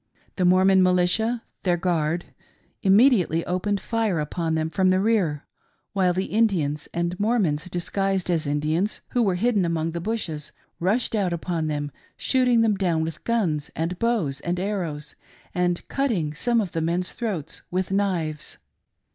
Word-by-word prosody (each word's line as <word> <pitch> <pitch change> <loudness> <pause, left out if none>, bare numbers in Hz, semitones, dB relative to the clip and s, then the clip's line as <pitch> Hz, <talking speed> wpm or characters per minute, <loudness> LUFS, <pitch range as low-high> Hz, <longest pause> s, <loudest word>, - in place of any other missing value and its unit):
The 185 - +1
Mor 185 +1 +5
mon 190 -1 +5
Militia 185 +6 +2
— - - -49
their 175 -2 +1
guard 170 -1 0 0.3
— - - -39
immediately 195 - +4
opened 195 +3 -1
fire 220 -7 0
upon 160 +2 -1
them 160 0 -1
from 190 0 +2
the 185 0 +3
rear, 190 -9 +1 0.5
while 190 -3 +3
the 185 +2 -1
Indians, 175 -10 +1
and 170 +1 -2
Mormons 205 -9 +1
disguised 190 +2 -1
as 160 -3 0
Indians, 155 +7 0
who 245 - +1
were 195 -5 +2
hidden 210 +1 +2
among 165 -1 -1
the 170 +1 -4
bushes, 170 -8 -3 0.3
rushed 215 +8 +1
out 195 -5 +1
upon 170 -1 -2
them, 145 -1 -2 0.3
shooting 250 -3 +3
them 215 -3 +2
down 170 -4 +1
with 160 0 -5
guns 175 -11 0
and 165 +3 -2
bows 215 - 0
and 175 +1 -2
arrows, 175 -7 -3 0.4
and 175 -1 0
cutting 210 - 0
some 235 +8 +1
of 190 -5 -4
the 165 - -2
men's 175 +3 0
throats 205 - -4
with 185 +1 -2
knives. 180 -7 -1
180 Hz, 165 wpm, -24 LUFS, 160-205 Hz, 0.5 s, Mor